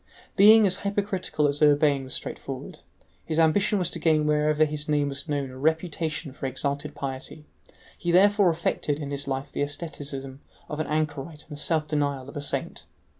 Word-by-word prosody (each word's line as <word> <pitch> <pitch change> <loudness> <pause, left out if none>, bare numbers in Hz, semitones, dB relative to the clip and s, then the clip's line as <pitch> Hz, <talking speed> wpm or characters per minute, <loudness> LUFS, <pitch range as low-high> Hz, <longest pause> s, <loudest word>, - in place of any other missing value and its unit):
Being 215 +2 +8
as 190 -1 +2
hypocritical 200 -6 -1
as 145 +1 -1
Urbain 145 -2 +4
was 130 - -4
straightforward, - - -6 0.4
his 160 - -3
ambition 185 +6 +3
was 180 -3 -1
to - - -5
gain 155 -2 +3
wherever 150 +1 +3
his 150 0 -4
name 145 -1 +2
was 140 +3 -7
known 140 -3 -2
a 130 - -10
reputation 160 -1 -1
for 135 - -4
exalted 140 +3 -3
piety; 140 +2 -6 0.5
he 175 - -3
therefore 200 +1 +5
affected 160 -3 -1
in 145 -2 -5
his 140 0 -3
life 135 +1 -3
the - - -3
asceticism 145 -2 -5 0.3
of 150 - -5
an 155 - -1
anchorite 150 0 -2
and 150 - -8
the 145 - -3
self 155 -2 +1
denial 145 -3 -1
of - - -12
a 145 - -3
saint. 145 - -3
150 Hz, 180 wpm, -26 LUFS, 140-165 Hz, 0.5 s, Being